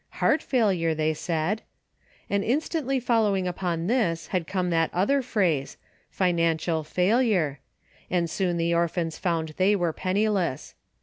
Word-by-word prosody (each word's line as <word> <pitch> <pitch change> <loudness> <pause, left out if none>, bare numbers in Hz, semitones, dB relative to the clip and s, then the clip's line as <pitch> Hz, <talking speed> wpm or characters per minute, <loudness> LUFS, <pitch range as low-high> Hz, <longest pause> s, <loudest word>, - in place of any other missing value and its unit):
Heart - - +3
failure, 190 - +1
they 155 0 +1
said! 165 +6 -2 0.7
And 200 0 0
instantly 270 +2 0
fol 235 -2 +2
lowing 195 -3 +1
upon 175 -2 -2
this 185 -7 0
had 180 -4 -1
come 180 -2 -1
that 165 -1 +2
other 240 +10 +2
phrase, 185 - 0 0.2
" - - -37
financial 165 -3 +1
failure," 180 - +1 0.5
and 175 -2 +1
soon 175 0 -1
the 170 0 +1
orphans 170 -1 -1
found 165 -4 -1
they 195 +3 +4
were 175 -4 0
penniless. 190 -6 -1
180 Hz, 140 wpm, -26 LUFS, 165-210 Hz, 0.7 s, they